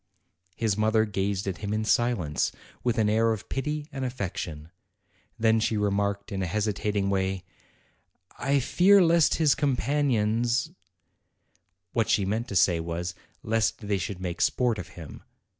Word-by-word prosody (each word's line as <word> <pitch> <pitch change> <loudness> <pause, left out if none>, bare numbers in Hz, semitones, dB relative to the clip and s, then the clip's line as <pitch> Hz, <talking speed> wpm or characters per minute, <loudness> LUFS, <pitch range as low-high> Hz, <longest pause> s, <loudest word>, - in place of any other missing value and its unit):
His 110 -4 0
mother 110 +1 +2
gazed 100 -1 -2
at 95 -3 -3
him 105 0 -2
in 110 0 -1
silence, 110 -11 +1 0.3
with 120 -1 0
an 110 -2 +3
air 110 +2 +3
of 105 -2 -8
pity 150 +2 -3
and 135 -1 -5
affection. 90 - -5 0.7
Then 110 0 +3
she 110 0 0
remarked, 100 0 -1
in 95 -1 -2
a 95 - -1
hesitat 105 +1 -1
ing 100 -1 +1
way, 95 -1 -1 1.0
T 140 +1 +3
fear 190 +8 +5
lest 170 -2 +4
his 155 -3 +4
companions 130 -2 +1 0.6
' 90 0 -45
What 115 -2 +1
she 100 - +2
meant 110 +5 -2
to 100 - -6
say 85 -1 +4
was, 85 +1 -4 0.3
"lest 115 +1 +1
they 100 -2 +1
should 90 +2 -4
make 90 -2 -4
sport 120 -4 +1
of 90 - -6
him." 80 -4 -9
105 Hz, 160 wpm, -27 LUFS, 95-120 Hz, 1.0 s, fear